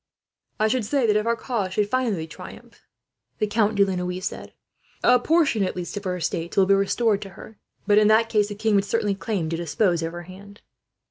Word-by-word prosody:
"I 215 Hz, -, +3 dB
should 250 Hz, +1 st, 0 dB
say 265 Hz, +4 st, 0 dB
that, 210 Hz, -2 st, +2 dB
if 210 Hz, +2 st, +1 dB
our 235 Hz, -, +2 dB
cause 225 Hz, -6 st, -3 dB
should 210 Hz, -1 st, +1 dB
finally 220 Hz, -8 st, -1 dB
triumph, 160 Hz, -, -12 dB, 0.6 s
a 200 Hz, +2 st, -1 dB
portion 310 Hz, -10 st, +2 dB
at 185 Hz, -, -2 dB
least 180 Hz, +1 st, -5 dB
of 205 Hz, -, -5 dB
her 180 Hz, -1 st, -1 dB
estates 170 Hz, 0 st, -3 dB
will 195 Hz, -, +6 dB
be 195 Hz, -, +4 dB
restored 200 Hz, +2 st, +1 dB
to 195 Hz, -, -7 dB
her; 220 Hz, -, -13 dB, 0.3 s
but 205 Hz, 0 st, +5 dB
in 210 Hz, -, +4 dB
that 220 Hz, +1 st, +4 dB
case 210 Hz, -2 st, +1 dB
the 205 Hz, -, -7 dB
king 220 Hz, +1 st, 0 dB
would 200 Hz, -1 st, +3 dB
certainly 205 Hz, -1 st, 0 dB
claim 195 Hz, -4 st, -3 dB
to 165 Hz, -, -2 dB
dispose 175 Hz, +1 st, 0 dB
of 165 Hz, 0 st, -4 dB
her 175 Hz, 0 st, -7 dB
hand." 200 Hz, +3 st, -13 dB
205 Hz, 195 wpm, -24 LUFS, 185-220 Hz, 0.6 s, will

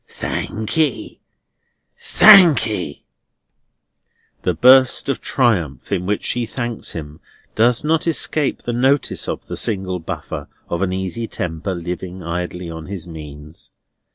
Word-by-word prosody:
"Thank 110 Hz, +6 st, -4 dB
ye! 155 Hz, -5 st, -1 dB, 0.7 s
Thank 185 Hz, -, +7 dB
ye!" 90 Hz, -10 st, -4 dB, 1.4 s
The -, -, -1 dB
burst 130 Hz, +2 st, +5 dB
of 135 Hz, -, -1 dB
triumph 90 Hz, -, 0 dB
in 90 Hz, -2 st, -1 dB
which 105 Hz, 0 st, -1 dB
she 120 Hz, -2 st, -1 dB
thanks 120 Hz, -2 st, -4 dB
him 75 Hz, -1 st, -8 dB, 0.3 s
does 120 Hz, +3 st, +2 dB
not 160 Hz, +2 st, +1 dB
escape 155 Hz, -2 st, 0 dB
the 120 Hz, -, -3 dB
notice 130 Hz, +3 st, +1 dB
of -, -, -5 dB
the -, -, -6 dB
single 95 Hz, -4 st, -2 dB
buffer 75 Hz, -2 st, -6 dB, 0.2 s
of 85 Hz, -, -3 dB
an 95 Hz, -2 st, 0 dB
easy 95 Hz, +5 st, -3 dB
temper 85 Hz, +1 st, -4 dB
living 90 Hz, +1 st, -6 dB
idly 90 Hz, +1 st, -4 dB
on 80 Hz, -1 st, -8 dB
his 95 Hz, -3 st, -7 dB
means. 75 Hz, -1 st, -11 dB
95 Hz, 130 wpm, -19 LUFS, 85-125 Hz, 1.4 s, Thank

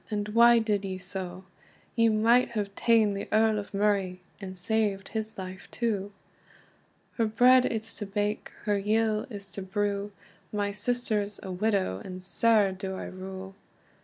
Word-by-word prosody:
and 210 Hz, -1 st, -2 dB
why 235 Hz, +2 st, +7 dB
did 210 Hz, -3 st, +1 dB
ye 190 Hz, -1 st, -3 dB
so? 185 Hz, 0 st, -7 dB, 0.5 s
You 230 Hz, -1 st, +4 dB
might 230 Hz, +3 st, +3 dB
have 205 Hz, -3 st, -2 dB
taen 220 Hz, -2 st, +3 dB
the 200 Hz, -, -4 dB
Earl 220 Hz, 0 st, +3 dB
o 205 Hz, -, -6 dB
Murray, 195 Hz, -3 st, +1 dB, 0.2 s
and 190 Hz, -2 st, -7 dB
saved 200 Hz, 0 st, 0 dB
his 220 Hz, 0 st, -4 dB
life 185 Hz, 0 st, -7 dB
too." 205 Hz, -4 st, -2 dB, 1.1 s
"Her 225 Hz, -2 st, +2 dB
bread 250 Hz, +3 st, +5 dB
it's 220 Hz, -1 st, -4 dB
to 205 Hz, -, -4 dB
bake, 205 Hz, +1 st, -2 dB, 0.2 s
her 205 Hz, -1 st, +2 dB
yill 215 Hz, +2 st, +1 dB
is 200 Hz, -3 st, -9 dB
to 200 Hz, -, -6 dB
brew; 200 Hz, +1 st, -2 dB, 0.4 s
My 205 Hz, -1 st, -1 dB
sister's 210 Hz, -1 st, -1 dB
a 190 Hz, -, -5 dB
widow, 190 Hz, -, 0 dB
and 185 Hz, 0 st, -8 dB
sair 210 Hz, 0 st, +3 dB
do 190 Hz, 0 st, -5 dB
I -, -, -5 dB
rue. 190 Hz, +1 st, -8 dB
205 Hz, 160 wpm, -28 LUFS, 195-220 Hz, 1.1 s, why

